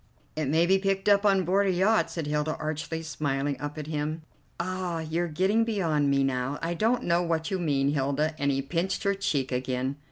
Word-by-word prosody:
"It 155 Hz, -2 st, -1 dB
may 160 Hz, +4 st, +3 dB
be 190 Hz, +2 st, +4 dB
picked 195 Hz, 0 st, -1 dB
up 205 Hz, 0 st, +5 dB
on 195 Hz, -2 st, +3 dB
board 195 Hz, +3 st, +2 dB
a -, -, +3 dB
yacht," 195 Hz, +5 st, +2 dB
said 165 Hz, -3 st, -4 dB
Hilda 150 Hz, +1 st, -1 dB
archly, 160 Hz, +1 st, -4 dB
smiling 145 Hz, -2 st, -1 dB
up 145 Hz, +1 st, -5 dB
at 150 Hz, -, -4 dB
him. 155 Hz, +1 st, -3 dB, 0.4 s
"Ah, 180 Hz, -1 st, -2 dB
you're 165 Hz, +2 st, -1 dB
getting 190 Hz, +8 st, +2 dB
beyond 165 Hz, -10 st, +1 dB
me 140 Hz, 0 st, +3 dB
now. 135 Hz, +1 st, -1 dB
I 170 Hz, +1 st, 0 dB
don't 230 Hz, +7 st, +1 dB
know 170 Hz, 0 st, +2 dB
what 165 Hz, -1 st, -1 dB
you 190 Hz, -, 0 dB
mean, 140 Hz, -5 st, +1 dB
Hilda," 145 Hz, +2 st, 0 dB
and 140 Hz, 0 st, +1 dB
he 135 Hz, -1 st, 0 dB
pinched 170 Hz, +6 st, -2 dB
her 200 Hz, -, +2 dB
cheek 145 Hz, -9 st, -1 dB
again. 130 Hz, +2 st, -2 dB
160 Hz, 210 wpm, -27 LUFS, 145-185 Hz, 0.4 s, up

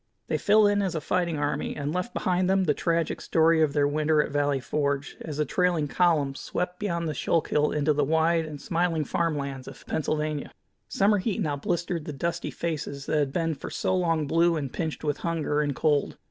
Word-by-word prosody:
They -, -, 0 dB
fell 210 Hz, +1 st, +5 dB
in 205 Hz, 0 st, +3 dB
as 190 Hz, -4 st, -1 dB
a -, -, 0 dB
fighting 170 Hz, +1 st, -1 dB
army, 145 Hz, 0 st, -2 dB
and 145 Hz, +1 st, -3 dB
left 180 Hz, +6 st, -2 dB
behind 185 Hz, -4 st, 0 dB
them 190 Hz, 0 st, +3 dB
the 155 Hz, -5 st, +2 dB
tragic 165 Hz, +1 st, -1 dB
story 165 Hz, 0 st, +3 dB
of 150 Hz, -3 st, +2 dB
their 145 Hz, -1 st, +3 dB
winter 155 Hz, +1 st, +1 dB
at 150 Hz, -, +1 dB
Valley 145 Hz, -1 st, +1 dB
Forge, 140 Hz, +1 st, -2 dB
as 150 Hz, -3 st, -6 dB
the 150 Hz, -, +1 dB
trailing 175 Hz, 0 st, +1 dB
columns 150 Hz, -5 st, +1 dB
swept 180 Hz, 0 st, -3 dB
beyond 170 Hz, -5 st, -2 dB
the 155 Hz, -, -2 dB
Schuylkill 150 Hz, 0 st, +1 dB
into 150 Hz, 0 st, +2 dB
the 145 Hz, 0 st, +1 dB
wide 160 Hz, +3 st, +2 dB
and 155 Hz, -2 st, -7 dB
smiling 165 Hz, -1 st, 0 dB
farm 165 Hz, +1 st, 0 dB
lands 135 Hz, -2 st, -5 dB
of -, -, -11 dB
Pennsylvania. 155 Hz, -1 st, -2 dB, 0.4 s
Summer 205 Hz, +1 st, +2 dB
heat 205 Hz, +2 st, -2 dB
now 150 Hz, -3 st, 0 dB
blistered 170 Hz, +2 st, -2 dB
the 150 Hz, -, -5 dB
dusty 170 Hz, +5 st, -2 dB
faces 145 Hz, -4 st, -4 dB
that 155 Hz, -, +1 dB
had 140 Hz, -2 st, 0 dB
been 165 Hz, +1 st, 0 dB
for 140 Hz, -, -7 dB
so 185 Hz, -, -1 dB
long 165 Hz, -4 st, +1 dB
blue 165 Hz, +3 st, +3 dB
and 140 Hz, -5 st, -4 dB
pinched 160 Hz, -2 st, -3 dB
with 145 Hz, -2 st, 0 dB
hunger 155 Hz, -3 st, -1 dB
and 145 Hz, -2 st, -1 dB
cold. 150 Hz, -1 st, +1 dB
155 Hz, 210 wpm, -26 LUFS, 145-170 Hz, 0.4 s, fell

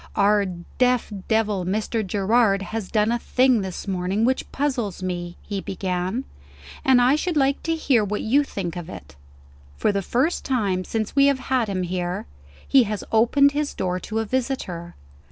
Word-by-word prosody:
"Our 205 Hz, 0 st, +3 dB, 0.3 s
deaf 250 Hz, -3 st, +2 dB
devil, 215 Hz, -4 st, +1 dB
Mr. 215 Hz, +4 st, -1 dB
Gerard, 200 Hz, +1 st, +2 dB
has 220 Hz, -1 st, -5 dB
done 215 Hz, 0 st, +2 dB
a 240 Hz, -, 0 dB
thing 255 Hz, -2 st, +3 dB
this 190 Hz, +1 st, -6 dB
morning 190 Hz, +3 st, 0 dB
which 260 Hz, +1 st, -1 dB
puzzles 245 Hz, -10 st, -2 dB
me," 175 Hz, -1 st, -4 dB
he 200 Hz, -2 st, -4 dB
began; 185 Hz, +5 st, -2 dB, 0.6 s
"and 260 Hz, -2 st, +5 dB
I 250 Hz, +3 st, +5 dB
should 330 Hz, +1 st, -1 dB
like 275 Hz, 0 st, +2 dB
to 330 Hz, 0 st, -1 dB
hear 265 Hz, -8 st, +2 dB
what 210 Hz, +1 st, -2 dB
you 275 Hz, +6 st, +3 dB
think 185 Hz, -10 st, -5 dB
of 175 Hz, -1 st, -6 dB
it. 70 Hz, -, -10 dB, 0.6 s
For -, -, +2 dB
the 200 Hz, -1 st, -1 dB
first 260 Hz, -, 0 dB
time 200 Hz, -8 st, 0 dB
since 220 Hz, +1 st, -3 dB
we 280 Hz, 0 st, +6 dB
have 280 Hz, -1 st, +3 dB, 0.2 s
had 245 Hz, -4 st, +2 dB
him 185 Hz, -2 st, -1 dB
here, 180 Hz, 0 st, -3 dB, 0.4 s
he 265 Hz, -3 st, +5 dB
has 210 Hz, -1 st, -3 dB
opened 260 Hz, +6 st, +4 dB
his 295 Hz, 0 st, -2 dB
door 180 Hz, -1 st, -1 dB
to 220 Hz, +4 st, -5 dB
a 225 Hz, -, 0 dB
visitor. 210 Hz, -9 st, -3 dB
215 Hz, 175 wpm, -23 LUFS, 190-255 Hz, 0.6 s, we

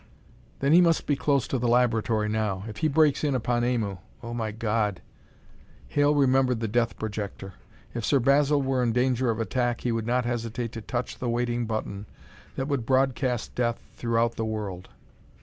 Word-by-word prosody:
"Then 140 Hz, +3 st, +3 dB
he 175 Hz, -, +8 dB
must 170 Hz, -2 st, +3 dB
be 145 Hz, -, +1 dB
close 140 Hz, -2 st, +1 dB
to 130 Hz, -, -1 dB
the 120 Hz, -, 0 dB
laboratory 115 Hz, -3 st, +2 dB
now. 105 Hz, -3 st, -1 dB
If 105 Hz, -2 st, -8 dB
he 155 Hz, -, +1 dB
breaks 155 Hz, -1 st, +3 dB
in 145 Hz, -3 st, +1 dB
upon 120 Hz, -1 st, 0 dB
Aimu 115 Hz, -6 st, -1 dB, 0.2 s
oh, 120 Hz, 0 st, -5 dB
my 115 Hz, -2 st, -2 dB
God!" 105 Hz, -2 st, -1 dB, 0.9 s
Hale 145 Hz, -, +3 dB
remembered 130 Hz, -3 st, +3 dB
the 115 Hz, -, -1 dB
death 115 Hz, +1 st, 0 dB
projector. 100 Hz, -3 st, -5 dB, 0.4 s
If 120 Hz, -, -4 dB
Sir 140 Hz, +4 st, +3 dB
Basil 140 Hz, +2 st, +3 dB
were 130 Hz, -1 st, 0 dB
in 120 Hz, -2 st, +1 dB
danger 125 Hz, 0 st, +1 dB
of 115 Hz, 0 st, -1 dB
attack, 120 Hz, +1 st, -1 dB
he 120 Hz, -, 0 dB
would 115 Hz, -1 st, -2 dB
not 125 Hz, 0 st, +1 dB
hesitate 115 Hz, -1 st, -3 dB
to 115 Hz, -, -7 dB
touch 120 Hz, +3 st, -4 dB
the 125 Hz, -, -2 dB
waiting 120 Hz, 0 st, -1 dB
button 105 Hz, -2 st, -4 dB, 0.5 s
that 135 Hz, -, -2 dB
would 140 Hz, -5 st, -1 dB
broadcast 130 Hz, -1 st, 0 dB
death 120 Hz, -1 st, 0 dB, 0.2 s
throughout 115 Hz, 0 st, 0 dB
the 115 Hz, -, -1 dB
world. 105 Hz, -4 st, -4 dB
120 Hz, 185 wpm, -26 LUFS, 110-130 Hz, 0.9 s, he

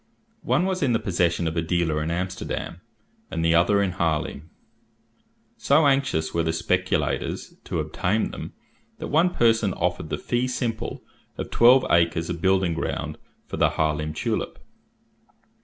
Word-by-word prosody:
One 180 Hz, -, +1 dB
was 190 Hz, -1 st, -1 dB
in 130 Hz, -5 st, +2 dB
the 115 Hz, -, +2 dB
possession 85 Hz, -5 st, 0 dB
of 80 Hz, -, -3 dB
a 85 Hz, -, +1 dB
dealer 80 Hz, -2 st, 0 dB
in 75 Hz, -, -2 dB
Amsterdam, 90 Hz, 0 st, -4 dB, 0.5 s
and 80 Hz, -, -2 dB
the 80 Hz, -, +4 dB
other 95 Hz, +4 st, +4 dB
in 95 Hz, -, 0 dB
Harlaem. 80 Hz, -3 st, -2 dB, 1.1 s
So 150 Hz, +2 st, +3 dB
anxious 135 Hz, -, +1 dB
were 85 Hz, -, +1 dB
the 80 Hz, 0 st, 0 dB
speculators 90 Hz, +3 st, -1 dB
to -, -, -2 dB
obtain 105 Hz, +5 st, -1 dB
them, -, -, -7 dB, 0.4 s
that -, -, -6 dB
one 165 Hz, +5 st, +4 dB
person 115 Hz, -, +2 dB
offered -, -, -2 dB
the -, -, -2 dB
fee 120 Hz, +1 st, -1 dB
simple 120 Hz, -3 st, -3 dB, 0.3 s
of -, -, -5 dB
twelve 125 Hz, +2 st, +6 dB
acres 85 Hz, 0 st, +2 dB
of 85 Hz, -2 st, -5 dB
building 95 Hz, -2 st, +2 dB
ground 80 Hz, -, -3 dB, 0.3 s
for -, -, -6 dB
the -, -, +4 dB
Harlaem 75 Hz, -1 st, 0 dB
tulip. 75 Hz, -, -3 dB
90 Hz, 155 wpm, -24 LUFS, 80-115 Hz, 1.1 s, twelve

